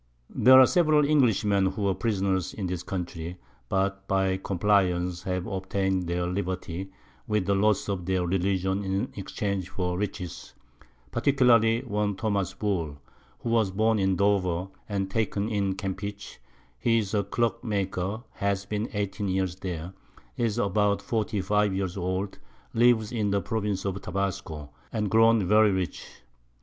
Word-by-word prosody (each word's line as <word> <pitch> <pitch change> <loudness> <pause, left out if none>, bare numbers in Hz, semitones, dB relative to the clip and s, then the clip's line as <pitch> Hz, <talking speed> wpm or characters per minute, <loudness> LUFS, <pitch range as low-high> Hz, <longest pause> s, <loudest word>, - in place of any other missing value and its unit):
There 130 +1 +7
are 130 - +9
several 155 -2 +4
Englishmen 105 -9 +3
who 100 +2 -3
were 100 -1 +2
Prisoners 95 -5 -1
in 100 - -3
this 90 -1 -3
Country, 90 -2 -5 0.3
that, 95 0 -1
by 95 -1 +1
Compliance, 90 -2 +1
have 90 -1 -2
obtain'd 95 -1 -1
their 85 +1 -1
Liberty, 90 0 -3 0.4
with 105 -3 +1
the 100 - +2
Loss 105 +1 +2
of 95 -3 -3
their 95 -1 +1
Religion 95 +2 0
in 95 +1 -1
exchange 100 -1 -3
for 90 -1 -2
Riches; 100 -4 -5 0.6
particularly 120 -3 +4
one 105 -5 -1
Thomas 100 -1 -1
Bull, 85 -9 -2 0.4
who - - -3
was 115 -3 +3
born 110 +3 +2
in 95 -1 +2
Dover, 95 -2 +1 0.2
and 100 -2 -1
taken 105 -1 0
in 100 -3 0
Campeche; 100 +1 -5 0.4
he 115 -1 +3
is 105 -3 -1
a 100 -1 +2
Clock 115 +3 -1
maker, 100 0 -2
has 100 0 -1
been 105 +4 -3
18 100 0 -2
Years 95 -1 -1
there, 90 -1 -5 0.4
is 115 -2 0
about 100 -1 +1
45 105 -2 0
Years 95 -2 -2
old, 95 +1 -3 0.3
lives 115 -2 +3
in 110 -4 0
the 100 0 +2
Province 100 0 -2
of 100 0 -2
Tabasco, 95 -7 -4 0.2
and 105 -2 -1
grown 115 -2 +5
very 105 +2 +5
rich. 95 -2 -2
100 Hz, 145 wpm, -27 LUFS, 95-105 Hz, 0.6 s, are